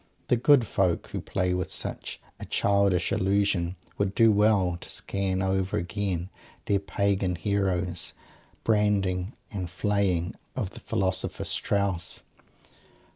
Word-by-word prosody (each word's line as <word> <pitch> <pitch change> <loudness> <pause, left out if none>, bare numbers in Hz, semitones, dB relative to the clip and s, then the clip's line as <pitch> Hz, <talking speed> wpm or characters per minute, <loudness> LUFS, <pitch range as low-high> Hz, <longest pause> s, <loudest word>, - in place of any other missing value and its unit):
The - - +5
good 125 +1 +5
folk 95 -5 0
who - - -4
play 90 -2 0
with 90 -1 -2
such - - -4 0.2
a - - -6
childish 100 -3 +2
illusion 95 -2 +1 0.2
would 100 -1 0
do 115 -1 +6
well 100 -4 +3
to - - -8
scan 95 -1 -1
over 95 0 0
again 95 -1 -2 0.3
their 100 -1 +2
"pagan" 100 -2 0
hero's 90 -1 0 0.5
branding 100 -2 +1 0.2
and 95 -4 -4
flaying 95 -1 0 0.2
of 110 -7 -2
the - - -10
philosopher 95 -1 -1
Strauss. 100 -4 0
95 Hz, 125 wpm, -27 LUFS, 90-100 Hz, 0.5 s, do